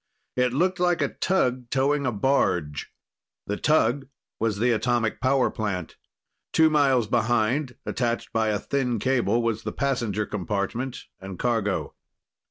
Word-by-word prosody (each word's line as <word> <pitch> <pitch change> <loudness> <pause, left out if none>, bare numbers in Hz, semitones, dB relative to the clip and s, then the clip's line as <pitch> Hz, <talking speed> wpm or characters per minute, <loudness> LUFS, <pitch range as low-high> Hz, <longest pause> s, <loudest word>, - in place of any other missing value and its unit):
It 125 -1 +2
looked 180 +7 +1
like 175 -1 +2
a - - 0
tug 125 -10 0
towing 140 +1 +1
a - - +1
barge. 90 - 0 0.5
The 105 - -2
tug 135 -1 +2 0.3
was 110 -2 0
the 120 +4 +2
atomic 120 -1 0
power 130 0 +2
plant. 95 -6 -3 0.6
Two 160 -1 +5
miles 135 -6 +3
behind, 120 +4 +1
attached 120 -2 -2
by 110 -1 +1
a 105 -1 +1
thin 125 +1 -1
cable, 120 -1 +1
was 115 -2 -1
the - - -4
passenger 120 -6 -1
compartment 105 +6 -3
and 95 -1 -8
cargo. 110 -4 -1
120 Hz, 140 wpm, -25 LUFS, 110-135 Hz, 0.6 s, Two